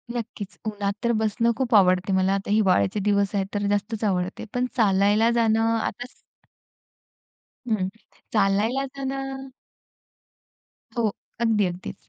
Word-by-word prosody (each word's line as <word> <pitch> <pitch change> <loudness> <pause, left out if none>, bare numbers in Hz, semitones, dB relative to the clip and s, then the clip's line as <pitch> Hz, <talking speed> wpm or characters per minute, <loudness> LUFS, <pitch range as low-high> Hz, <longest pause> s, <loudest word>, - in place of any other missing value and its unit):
नक्कीच. 215 -4 -6
उन्हात 205 -2 -2
तर 235 - +2
बसणं 220 +2 +1
खूप 245 -3 +1
आवडते 185 -1 +4
मला. 190 +1 +2
आता 195 +1 -3
हिवाळ्याचे 195 - +3
दिवस 200 0 +1
आहेत, 195 -1 +1
तर 205 0 -1
जास्तच 205 +2 -1
आवडते. 185 -2 -1
पण 245 0 +1
चालायला 205 0 +3
जाणं 225 -2 +2 0.2
आता 245 +2 -4 1.6
हं, 210 -5 0 0.5
चालायला 215 +6 +2
जाण 265 -1 -2 1.9
हो, 225 -2 +2 0.3
अगदी 220 -3 +3
अगदीच. 180 0 -5
205 Hz, 120 wpm, -24 LUFS, 195-225 Hz, 1.9 s, आवडते